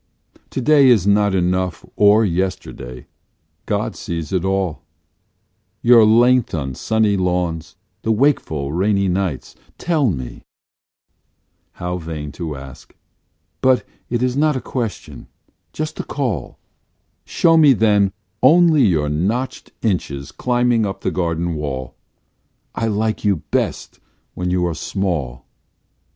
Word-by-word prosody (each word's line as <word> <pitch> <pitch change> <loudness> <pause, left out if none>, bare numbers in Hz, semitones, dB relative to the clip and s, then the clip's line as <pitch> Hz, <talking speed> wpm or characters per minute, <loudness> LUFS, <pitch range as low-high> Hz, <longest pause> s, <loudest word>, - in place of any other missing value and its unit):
To - - -4
day 145 +1 +5
is 115 -7 +4
not 100 -1 +3
enough 90 0 -1
or 105 +2 +5
yesterday: 85 -9 -4 0.6
God - - -1
sees 85 -2 -5
it 90 -2 0
all 95 -4 -1 1.0
Your 120 -1 +7
length 120 +1 +4
on 65 -4 -3
sunny 110 +7 +1
lawns, 90 -3 -2 0.3
the 110 - 0
wakeful 105 - +1
rainy 100 +2 +1
nights; 90 -6 -2 0.2
tell 155 -7 +1
me; 65 -9 -5 1.3
(how 90 +1 -4
vain 80 -3 -6
to 80 -3 -5
ask), 65 -1 -12 0.7
but 130 -1 +3 0.2
it 120 0 -1
is 125 0 0
not 150 +1 +2
a - - -2
question 120 -4 -5 0.4
just 155 0 -5
a - - -2
call; 120 - -3 0.7
Show 165 -1 +2
me 155 -3 +6
then, 105 -4 +3 0.3
only 160 +2 +5
your 80 -8 +2
notched 105 - -2
inches 75 - -2
climbing 120 -2 +1
up 100 -2 -4
the - - -1
garden 85 -1 -1
wall, 65 -5 -4 0.8
I 115 - -2
like 110 +1 -1
you 100 -7 +1
best - - -2 0.3
when 90 0 -3
you 90 0 +1
are 85 - -1
small. 75 -9 -3
95 Hz, 125 wpm, -19 LUFS, 85-120 Hz, 1.3 s, Your